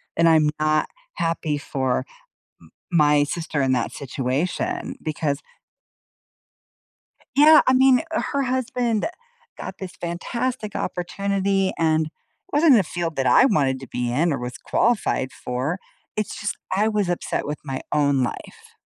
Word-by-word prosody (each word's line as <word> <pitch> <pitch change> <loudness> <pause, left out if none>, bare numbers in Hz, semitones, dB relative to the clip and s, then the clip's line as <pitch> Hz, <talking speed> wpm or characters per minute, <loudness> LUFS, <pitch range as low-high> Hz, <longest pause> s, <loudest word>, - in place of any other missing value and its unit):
and 165 0 +4
I'm 155 -2 +5
not 155 0 +2 0.3
happy 165 -3 -1
for 130 -3 -1
m - - -7 0.9
my 150 -1 +5
sister 155 -1 -2
in 130 -1 +2
that 120 - 0
situation 135 +5 -2
because 150 -2 -1 2.0
Yeah. 305 +2 +8
I 255 - +5
mean, 260 -1 +5
her 280 -3 -1
husband 250 -3 0 0.5
got - - -6
this 185 -2 -7
fantastic 215 +6 -3
opportunity 195 +1 -1
and 160 -1 +2 0.4
wasn't 295 -2 +5
in 225 - +7
a - - +2
field 170 -1 -3
that 135 -1 0
I - - +6
wanted 135 - +2
to 135 - -9
be 125 -1 -2
in 160 +5 +2
or - - -2
was 125 +1 -5
qualified 205 - 0
for. 130 +8 -3 0.4
It's 215 - -3
just 205 - -3 0.2
I 210 +3 +2
was 210 -4 0
upset 175 - -2
with 150 +1 -4
my 135 -2 -4
own 140 -3 +3
life. 120 - -7
165 Hz, 145 wpm, -23 LUFS, 140-210 Hz, 2.0 s, Yeah